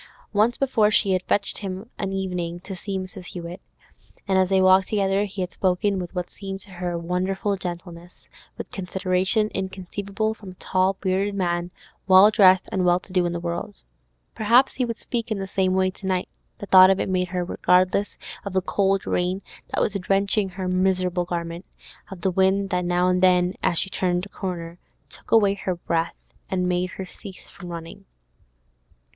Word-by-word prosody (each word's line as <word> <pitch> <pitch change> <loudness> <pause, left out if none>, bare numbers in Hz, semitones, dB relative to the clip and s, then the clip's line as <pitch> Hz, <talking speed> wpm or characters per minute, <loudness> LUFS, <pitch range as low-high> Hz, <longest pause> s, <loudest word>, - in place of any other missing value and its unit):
Once 215 +4 +3
before 230 -6 +3
she 200 -2 +2
had 185 -1 +2
fetched 200 +2 0
him 190 -2 -5
of 225 - -16
an 195 - -2
evening 180 -3 -3
to 190 +2 -8
see 195 +2 -4
Mrs. 185 0 -7
Hewett, 175 0 -7 0.7
and 195 - +1
as 185 -1 +2
they 190 -1 +3
walked 185 0 +5
together 200 -1 +1
he 195 -1 -6
had 180 0 -4
spoken 190 +1 +1
with 180 0 -7
what 180 -1 -3
seemed 195 -1 -7
to 195 - -9
her 175 -1 -3
wonderful 185 +4 -1
gentleness, 175 -1 -8 0.3
with - - -7
consideration 190 +3 0
inconceivable 195 +3 -3
from 200 -4 -11
a - - -23
tall, 185 +1 +1
bearded 195 +1 0
man, 175 -2 -1 0.4
well 190 +2 +8
dressed, 190 -4 +5
and 190 - 0
well 175 0 +4
to 185 - -15
do 180 -2 +2
in - - -2
the 170 - -3
world. 170 0 -4 0.6
Perhaps 235 +5 +4
he 255 - -1
would 230 -1 -4
speak 235 -2 -3
in 215 - -1
the 195 - -3
same 190 -1 0
way 185 0 +2
to 190 0 -9
night; 185 -1 0 0.3
the - - -7
thought 185 -1 +8
of 195 - +3
it - - -1
made 185 -1 0
her 180 -1 -2
regardless 185 +3 +2 0.3
of 200 - -5
the 190 - +2
cold 195 0 +1
rain 180 +2 -1 0.3
that - - 0
was 205 - +1
drenching 195 +1 +1
her 185 0 -5
miserable 185 -1 +1
garment, 170 0 -4 0.5
of 190 -3 -9
the 190 - +1
wind 190 +2 +2
that 180 0 0
now 175 +1 +2
and 180 0 +2
then, 180 -1 +4
as 170 - +1
she - - +2
turned 180 -1 0
a - - -12
corner, 175 -3 -6 0.3
took - - -13
away 205 -3 +5
her 190 -2 -3
breath, 170 -1 -2 0.2
and 180 -1 0
made 180 0 0
her 190 - -7
cease 190 +1 -12
from 180 -3 -10
running. 165 -1 -8
185 Hz, 195 wpm, -24 LUFS, 180-195 Hz, 0.7 s, well